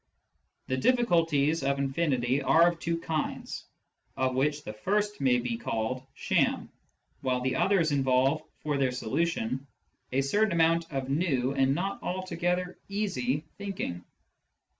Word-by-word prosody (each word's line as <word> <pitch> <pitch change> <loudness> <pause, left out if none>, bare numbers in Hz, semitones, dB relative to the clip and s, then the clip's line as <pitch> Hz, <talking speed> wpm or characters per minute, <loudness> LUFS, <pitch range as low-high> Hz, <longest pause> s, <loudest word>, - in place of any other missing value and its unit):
The 130 - -1
difficulties 165 - +2
of 140 0 +1
infinity 135 -2 +1
are 145 +6 +5
of 170 -1 -6
two 165 0 -1
kinds, 160 -2 -3 0.5
of 130 -1 +1
which 145 +3 0
the 105 - -6
first 205 - -1
may 130 -2 +4
be 120 -1 -2
called 115 +3 -2
sham, - - +1 0.5
while 130 -2 0
the 130 +1 0
others 185 -6 +3
involve, 135 +1 +2 0.2
for 150 -2 -1
their 130 -2 +2
solution, 130 0 -1 0.4
a 135 +2 +2
certain 205 +10 +2
amount 165 0 +2
of 135 -2 -2
new 135 -5 +1
and 135 0 +2
not 195 +4 -2
altogether 180 0 -2
easy 155 -10 -1 0.2
thinking. 190 - -4
145 Hz, 135 wpm, -29 LUFS, 130-170 Hz, 0.5 s, are